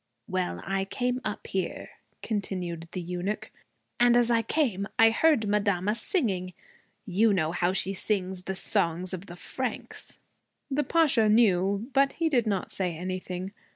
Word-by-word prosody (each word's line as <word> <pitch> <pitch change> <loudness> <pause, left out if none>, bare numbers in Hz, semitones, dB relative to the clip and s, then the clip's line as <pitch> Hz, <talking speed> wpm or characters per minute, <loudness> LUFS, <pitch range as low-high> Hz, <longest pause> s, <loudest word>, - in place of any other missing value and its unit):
'Well, 185 -1 -2
I 195 0 -1
came 250 +5 -1
up 210 - -4
here,' 190 -1 -3 0.3
continued 180 -6 -3
the 185 - -4
eunuch, 180 +4 -3 0.5
'and 240 0 +6
as 240 -1 +3
I 230 -1 +4
came 225 -6 0
I 225 0 +7
heard 245 -3 +3
madama 200 -1 +1
singing. 215 - -1 0.5
You 210 +4 +3
know 160 -4 +1
how 175 +1 +1
she 190 0 +2
sings 190 -2 -2
the 190 - -3
songs 175 0 0
of 185 +2 -6
the 175 - -9
Franks.' 250 +6 -4 0.5
The 290 +2 +1
Pasha 275 -8 +3
knew. 200 -1 +3
But 275 +1 +3
he 330 -1 0
did 245 -6 +2
not 195 -3 -1
say 180 -4 -1
anything. 185 +1 -4
200 Hz, 155 wpm, -28 LUFS, 185-230 Hz, 0.5 s, I